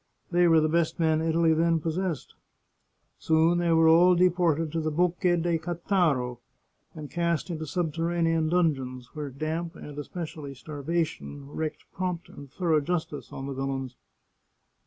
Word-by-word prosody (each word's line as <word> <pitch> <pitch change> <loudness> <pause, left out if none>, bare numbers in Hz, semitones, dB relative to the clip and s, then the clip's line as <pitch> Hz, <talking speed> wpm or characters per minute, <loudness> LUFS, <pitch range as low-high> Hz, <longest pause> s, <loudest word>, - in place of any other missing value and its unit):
They 175 0 +4
were 165 -1 +6
the 155 - +2
best 165 +1 0
men 160 -1 +2
Italy 165 0 +3
then 165 +1 +2
possessed. 165 0 -3 0.9
Soon 160 +2 +3
they 170 -1 +1
were 165 0 +5
all 175 +3 +6
deported 170 -3 +2
to 165 - -1
the 155 - -1
Bocche 175 +2 +1
de 170 -2 +1
Cattaro, 160 - 0 0.6
and 150 -2 -8
cast 170 0 -1
into 160 -1 -4
subterranean 165 0 0
dungeons, 135 -8 0
where 150 -2 -5
damp 160 +5 -4
and, 150 -1 -8
especially, 150 -2 -6
starvation 145 -1 -4
wreaked 155 0 -4
prompt 180 -1 -3
and 140 -2 -12
thorough 165 -2 +1
justice 160 -1 -3
on 135 - -6
the 140 - -4
villains. 135 -1 -3
160 Hz, 145 wpm, -27 LUFS, 150-170 Hz, 0.9 s, were